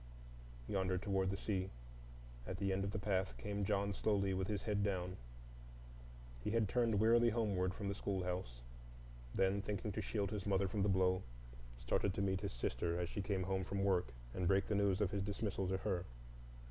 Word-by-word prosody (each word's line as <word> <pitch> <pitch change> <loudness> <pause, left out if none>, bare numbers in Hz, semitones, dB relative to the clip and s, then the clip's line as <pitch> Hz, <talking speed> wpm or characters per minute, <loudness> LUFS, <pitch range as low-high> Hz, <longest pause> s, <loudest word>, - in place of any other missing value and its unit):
Yonder, 95 -2 +1
toward 95 -1 +1
the 100 - -1
sea, 95 -2 -1 0.8
at 90 - -3
the 100 -1 +1
end 95 +1 0
of 100 - -1
the 105 - -3
path, 95 -2 0
came 100 -1 -2
John 100 0 +1
slowly, 100 -1 +1
with 95 0 -1
his 100 -1 -2
head 105 -2 +1
down. 90 -2 -1 1.3
He - - -1
had 110 -1 +2
turned 115 -1 +2
wearily 115 +2 +5
homeward 100 -5 +1
from 100 - -4
the 100 - 0
schoolhouse; 90 -11 -3 0.7
then, 95 +1 +3
thinking 105 +1 -3
to 110 - -2
shield 100 -1 -1
his 105 -2 -3
mother 100 -1 +3
from 100 +2 -1
the 100 - +3
blow, 95 -1 +3 0.6
started 100 +8 0
to - - 0
meet 95 -1 +1
his 100 -2 -2
sister 85 +7 -1
as 90 -1 -1
she 100 - -3
came 95 -1 -1 0.2
from 100 +1 -1
work 95 -7 +3 0.3
and 90 -1 0
break 95 +1 +4
the - - -1
news 100 -1 +2
of 100 -2 +2
his 100 - -1
dismissal 100 -1 -1
to 95 +1 +1
her. 95 -3 -1
100 Hz, 190 wpm, -38 LUFS, 95-105 Hz, 1.3 s, wearily